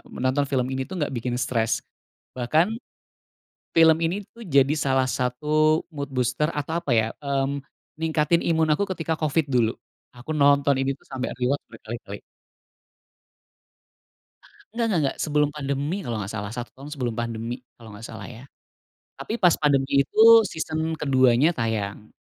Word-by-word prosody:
menonton 130 Hz, +3 st, 0 dB
film 130 Hz, -3 st, +1 dB
ini 130 Hz, 0 st, -3 dB
tuh 190 Hz, -, -6 dB
nggak 145 Hz, -, -1 dB
bikin 120 Hz, 0 st, -2 dB
stres. 115 Hz, -3 st, 0 dB, 0.6 s
Bahkan, 155 Hz, -, +2 dB, 1.0 s
film 160 Hz, -1 st, +6 dB
ini 180 Hz, +5 st, -1 dB
tuh 235 Hz, -, -12 dB
jadi 140 Hz, -1 st, +4 dB
salah 135 Hz, -3 st, +1 dB
satu 150 Hz, +5 st, +1 dB
mood 140 Hz, -1 st, -4 dB
booster 125 Hz, +3 st, 0 dB
atau 150 Hz, 0 st, -3 dB
apa 145 Hz, -, -5 dB
ya, 110 Hz, -1 st, +3 dB, 0.2 s
mmm, 140 Hz, 0 st, -1 dB, 0.4 s
ningkatin 160 Hz, +1 st, +2 dB
imun 160 Hz, -2 st, +2 dB
aku 165 Hz, -, -1 dB
ketika 160 Hz, 0 st, -1 dB
Covid 155 Hz, 0 st, +1 dB
dulu, 115 Hz, -3 st, +3 dB, 0.4 s
aku 125 Hz, +6 st, -6 dB
nonton 140 Hz, -1 st, +4 dB
ini 135 Hz, 0 st, 0 dB
tuh -, -, -28 dB
sampai 130 Hz, -1 st, -4 dB
rewatch 130 Hz, +3 st, 0 dB
berkali-kali. 110 Hz, -3 st, -8 dB, 2.5 s
Nggak 235 Hz, -, 0 dB
nggak 185 Hz, -7 st, +1 dB
nggak 135 Hz, -, -1 dB
sebelum 150 Hz, -1 st, +1 dB
pandemi 140 Hz, +2 st, -2 dB
kalau 120 Hz, -8 st, -3 dB
nggak 100 Hz, -1 st, -5 dB
salah 100 Hz, -1 st, -4 dB
1 120 Hz, -1 st, -5 dB
tahun 140 Hz, +3 st, -10 dB
sebelum 125 Hz, -5 st, -3 dB
pandemi 115 Hz, 0 st, -3 dB, 0.2 s
kalau 115 Hz, -2 st, -13 dB
nggak 110 Hz, +3 st, -9 dB
salah -, -, -8 dB
ya, 120 Hz, 0 st, -11 dB, 0.8 s
tapi -, -, -5 dB
pas 175 Hz, -3 st, +5 dB
pandemi 140 Hz, -2 st, +2 dB
itu -, -, -11 dB, 0.3 s
season 160 Hz, 0 st, -3 dB, 0.2 s
keduanya 130 Hz, 0 st, +4 dB
tayang. 110 Hz, -3 st, -3 dB
135 Hz, 150 wpm, -24 LUFS, 120-155 Hz, 2.5 s, film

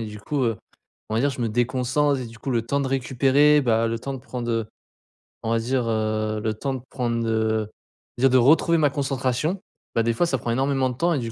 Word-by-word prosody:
et 115 Hz, -, -4 dB
du 105 Hz, 0 st, -8 dB
coup, 135 Hz, +7 st, -2 dB
heu, 115 Hz, -3 st, +1 dB, 0.5 s
on 110 Hz, -, -1 dB
va 115 Hz, -, +2 dB
dire 140 Hz, +3 st, +2 dB
je 130 Hz, -, -7 dB
me 115 Hz, -, 0 dB
déconcentre 130 Hz, +5 st, +1 dB
et 125 Hz, -, -5 dB
du 115 Hz, 0 st, -12 dB
coup 135 Hz, -, -4 dB
le 120 Hz, -3 st, +1 dB
temps 140 Hz, +5 st, -1 dB
de 135 Hz, -, -1 dB
récupérer 135 Hz, +3 st, +3 dB
bah, 115 Hz, -3 st, +2 dB
le 115 Hz, 0 st, -2 dB
temps 135 Hz, +2 st, -4 dB
de -, -, -6 dB
prendre 125 Hz, -2 st, -5 dB
heu 115 Hz, -2 st, -1 dB, 0.8 s
on 110 Hz, -, -2 dB
va 115 Hz, -, +3 dB
dire 125 Hz, +1 st, -1 dB
heu, 110 Hz, -1 st, -1 dB
le 110 Hz, -1 st, 0 dB
temps 135 Hz, +5 st, -3 dB
de 130 Hz, -, -6 dB
prendre 115 Hz, -3 st, -1 dB
heu 110 Hz, -1 st, 0 dB, 0.5 s
déjà 135 Hz, +2 st, +5 dB
de 130 Hz, -, +4 dB
retrouver 155 Hz, +6 st, +4 dB
ma 150 Hz, -2 st, +3 dB
concentration. 135 Hz, +4 st, -1 dB, 0.4 s
Bah, 115 Hz, -, +3 dB
des 115 Hz, -, +1 dB
fois 175 Hz, -, +1 dB
ça 140 Hz, -6 st, 0 dB
prend 120 Hz, 0 st, -3 dB
énormément 135 Hz, +1 st, +1 dB
de 125 Hz, -, -5 dB
temps 170 Hz, +4 st, +2 dB
et 145 Hz, -, 0 dB
du 115 Hz, -2 st, -4 dB
125 Hz, 250 wpm, -24 LUFS, 115-135 Hz, 0.8 s, déjà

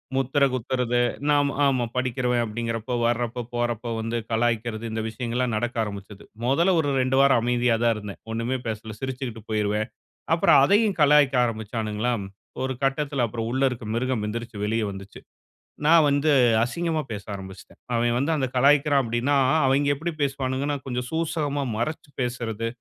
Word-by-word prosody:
முத்திரை 135 Hz, +2 st, +2 dB
குத்துறது, 125 Hz, 0 st, 0 dB, 0.3 s
நாம் 145 Hz, -1 st, +3 dB, 0.2 s
ஆமா. 130 Hz, -3 st, +2 dB
படிக்கிறவன் 125 Hz, -1 st, 0 dB
அப்படிங்குறப்போ, 115 Hz, +1 st, -3 dB
வர்றப்ப 120 Hz, 0 st, -1 dB
போறப்ப 120 Hz, -1 st, -2 dB
வந்து 115 Hz, +1 st, -2 dB
கலாய்க்கிறது, 115 Hz, -1 st, 0 dB
இந்த 110 Hz, 0 st, -2 dB
விஷயங்கள்லாம் 120 Hz, +1 st, -2 dB
நடக்க 120 Hz, +3 st, -2 dB
ஆரம்பிச்சுது. 100 Hz, -1 st, -8 dB, 0.2 s
முதல்ல 170 Hz, +8 st, +3 dB
ஒரு 145 Hz, -, +1 dB
2 130 Hz, 0 st, +1 dB
வாரம் 140 Hz, -4 st, +5 dB
அமைதியா 120 Hz, 0 st, +2 dB
தான் 115 Hz, -1 st, +4 dB
இருந்தேன், 105 Hz, -2 st, -8 dB
ஒண்ணுமே 115 Hz, +3 st, -1 dB
பேசல. 110 Hz, 0 st, -5 dB
சிரிச்சுகிட்டு 130 Hz, -3 st, -5 dB
போயிருவேன். 105 Hz, 0 st, 0 dB, 0.5 s
அப்பறம் 165 Hz, -4 st, +5 dB
அதையும் 205 Hz, +6 st, +3 dB
கலாய்க்க 145 Hz, -2 st, +5 dB
ஆரம்பிச்சானுங்களா, 110 Hz, +1 st, -2 dB, 0.5 s
ஒரு 130 Hz, 0 st, -1 dB
கட்டத்தில 135 Hz, -1 st, 0 dB
அப்பறம் 115 Hz, +1 st, -4 dB
உள்ள 130 Hz, +1 st, 0 dB
இருக்க 120 Hz, -3 st, -7 dB
மிருகம் 125 Hz, -2 st, -1 dB
எந்திரிச்சு 115 Hz, 0 st, -5 dB
வெளிய 110 Hz, +1 st, 0 dB
வந்துச்சு. 100 Hz, +1 st, -10 dB, 0.7 s
நான் 160 Hz, 0 st, +6 dB
வந்து 145 Hz, +2 st, +2 dB, 0.3 s
அசிங்கமா 160 Hz, +5 st, -1 dB
பேச 105 Hz, -2 st, -5 dB
ஆரம்பிச்சுட்டேன். 95 Hz, -1 st, -11 dB
அவன் 120 Hz, 0 st, +1 dB
வந்து 140 Hz, +5 st, 0 dB
அந்த 130 Hz, -, 0 dB
கலாய்க்கிறான் 140 Hz, +1 st, +4 dB
அப்படின்னா, 120 Hz, +4 st, 0 dB, 0.3 s
அவைங்க 140 Hz, +2 st, +2 dB
எப்படி 165 Hz, +4 st, -3 dB
பேசுவானுங்கனா, 135 Hz, +1 st, -1 dB
கொஞ்சம் 125 Hz, -1 st, -3 dB
சூசகமாக 150 Hz, -4 st, -1 dB
மறைச்சு 145 Hz, +5 st, -3 dB
பேசுறது, 115 Hz, -2 st, -3 dB
125 Hz, 145 wpm, -25 LUFS, 115-140 Hz, 0.7 s, நான்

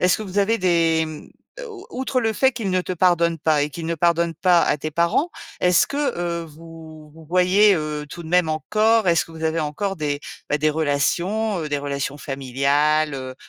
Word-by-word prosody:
est-ce 180 Hz, 0 st, +3 dB
que 220 Hz, -, -6 dB
vous 195 Hz, 0 st, -4 dB
avez 215 Hz, +3 st, +2 dB
des 165 Hz, -3 st, +2 dB
mmh, 155 Hz, -1 st, -9 dB, 0.4 s
o 415 Hz, -2 st, -11 dB
outre 260 Hz, -4 st, -2 dB
le 225 Hz, 0 st, +1 dB
fait 265 Hz, +4 st, +3 dB
qu'il 220 Hz, -5 st, -3 dB
ne 185 Hz, 0 st, +1 dB
te 185 Hz, -, -5 dB
pardonne 170 Hz, -1 st, +2 dB
pas 155 Hz, -1 st, +2 dB
et 150 Hz, -, -1 dB
qu'il 160 Hz, +3 st, -8 dB
ne 170 Hz, -, -1 dB
pardonne 170 Hz, +1 st, +1 dB
pas 175 Hz, +1 st, +3 dB
à 150 Hz, -, +1 dB
tes 155 Hz, +2 st, -4 dB
parents, 170 Hz, -, +1 dB, 0.3 s
est-ce 180 Hz, -1 st, +4 dB
que, 280 Hz, -, -6 dB, 0.2 s
heu, 170 Hz, -1 st, -2 dB
vous 160 Hz, -1 st, -13 dB
vous 160 Hz, -1 st, -15 dB
voyez, 185 Hz, +3 st, +4 dB
heu, 150 Hz, -2 st, -4 dB
tout 170 Hz, -, -9 dB
de 160 Hz, -, -9 dB
même 180 Hz, -2 st, +3 dB
encore? 215 Hz, +7 st, +1 dB
Est-ce 170 Hz, -2 st, +2 dB
que 165 Hz, -, -14 dB
vous 160 Hz, 0 st, -7 dB
avez 160 Hz, +1 st, 0 dB
encore 190 Hz, +6 st, -3 dB
des, 145 Hz, -2 st, -2 dB, 0.3 s
bah, 150 Hz, -, +1 dB
des 155 Hz, +1 st, +1 dB
relations, 170 Hz, +8 st, 0 dB
heu, 155 Hz, -, -4 dB
des 145 Hz, -, -1 dB
relations 140 Hz, 0 st, -4 dB
familiales, 140 Hz, +3 st, 0 dB
heu 130 Hz, -1 st, -6 dB
165 Hz, 215 wpm, -22 LUFS, 150-185 Hz, 0.4 s, est-ce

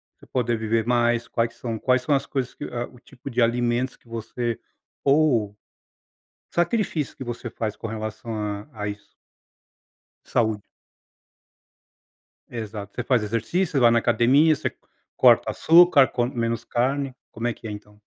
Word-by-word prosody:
você -, -, -19 dB
poder 120 Hz, -2 st, 0 dB
viver 110 Hz, 0 st, 0 dB
mais? 120 Hz, -1 st, +2 dB
Quais 115 Hz, 0 st, -1 dB
são 115 Hz, -1 st, -4 dB
quais 130 Hz, +2 st, +2 dB
são 145 Hz, +3 st, 0 dB
as 135 Hz, +1 st, -1 dB
coisas 130 Hz, -4 st, -3 dB
que -, -, -7 dB
ah, 120 Hz, 0 st, -4 dB
o 125 Hz, -, -17 dB
tipo 125 Hz, +3 st, -11 dB
de 125 Hz, -1 st, 0 dB
alimentos 120 Hz, +2 st, +1 dB
que -, -, -29 dB
você, 115 Hz, +1 st, -4 dB, 0.4 s
ou 135 Hz, -8 st, +3 dB
o -, -, -28 dB, 1.0 s
sacrifício 175 Hz, -, 0 dB
que 135 Hz, -, -7 dB
você 120 Hz, 0 st, -5 dB
faz 110 Hz, -2 st, -4 dB
com 115 Hz, -, -6 dB
relação 110 Hz, +1 st, -5 dB
a 105 Hz, +2 st, -4 dB
a 105 Hz, -1 st, -4 dB
isso? 105 Hz, 0 st, -8 dB, 1.1 s
Saúde. 110 Hz, -3 st, 0 dB, 1.9 s
Exato. 105 Hz, -3 st, -7 dB
Você 125 Hz, -, -2 dB
faz 125 Hz, -3 st, +2 dB
exercício? 120 Hz, -, -1 dB
Você 140 Hz, -, +3 dB
vai 120 Hz, -2 st, +6 dB
na 115 Hz, -, +4 dB
academia? 125 Hz, +7 st, +4 dB
Você -, -, -3 dB, 0.4 s
corta -, -, +5 dB
açúcar? 165 Hz, -5 st, +6 dB
Come 125 Hz, +1 st, -2 dB
menos 115 Hz, -1 st, -1 dB
carne? 135 Hz, +2 st, -1 dB, 0.2 s
Como 115 Hz, +2 st, -3 dB
é 120 Hz, -, 0 dB
que 115 Hz, -, -10 dB
é, -, -, -5 dB
então? 105 Hz, 0 st, -11 dB
120 Hz, 160 wpm, -24 LUFS, 110-130 Hz, 1.9 s, vai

